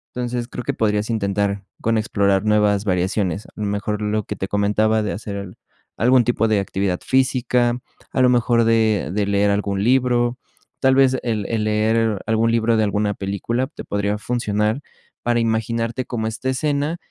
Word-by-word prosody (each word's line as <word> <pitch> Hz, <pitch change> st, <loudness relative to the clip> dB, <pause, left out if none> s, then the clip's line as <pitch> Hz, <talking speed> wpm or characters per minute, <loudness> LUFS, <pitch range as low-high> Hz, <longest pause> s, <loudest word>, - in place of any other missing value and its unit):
Entonces, 120 Hz, -1 st, -3 dB
creo 125 Hz, -, -6 dB
que -, -, -1 dB
podrías 105 Hz, 0 st, 0 dB
intentar 100 Hz, -2 st, -1 dB, 0.2 s
con 115 Hz, 0 st, +1 dB
explorar 100 Hz, -3 st, +1 dB
nuevas 105 Hz, -1 st, +2 dB
variaciones, 95 Hz, 0 st, -1 dB
a -, -, -17 dB
lo 105 Hz, -, -3 dB
mejor 105 Hz, +1 st, -2 dB
lo 105 Hz, 0 st, 0 dB
que -, -, -5 dB
te 95 Hz, -, -3 dB
comentaba 105 Hz, +2 st, +1 dB
de 105 Hz, -, -2 dB
hacer 100 Hz, -3 st, -6 dB, 0.4 s
algún 125 Hz, +3 st, +4 dB
tipo 115 Hz, -2 st, +1 dB
de 110 Hz, -2 st, +2 dB
actividad 95 Hz, -2 st, -1 dB
física, 125 Hz, -2 st, +1 dB, 0.3 s
a 130 Hz, -, +1 dB
lo 125 Hz, -, +5 dB
mejor 120 Hz, -1 st, +3 dB
de 110 Hz, -2 st, +2 dB
de 105 Hz, 0 st, 0 dB
leer 100 Hz, 0 st, +2 dB
algún 100 Hz, -1 st, -1 dB
libro. 125 Hz, 0 st, +2 dB, 0.4 s
Tal 130 Hz, 0 st, +3 dB
vez, 130 Hz, -1 st, +4 dB
el 110 Hz, -4 st, -1 dB
el 110 Hz, -2 st, -1 dB
leer 110 Hz, 0 st, +1 dB
algún 110 Hz, +1 st, +2 dB
libro 115 Hz, 0 st, +2 dB
de 110 Hz, -, +3 dB
alguna 105 Hz, 0 st, 0 dB
película 100 Hz, +6 st, -2 dB
te 150 Hz, -, -10 dB
podría 100 Hz, 0 st, -1 dB
funcionar 105 Hz, +1 st, -1 dB, 0.4 s
para 120 Hz, 0 st, +1 dB
imaginarte 115 Hz, +2 st, -1 dB
cómo 110 Hz, -2 st, -3 dB
esta 110 Hz, +4 st, -3 dB
escena, 145 Hz, +4 st, -1 dB
110 Hz, 170 wpm, -21 LUFS, 100-120 Hz, 0.4 s, lo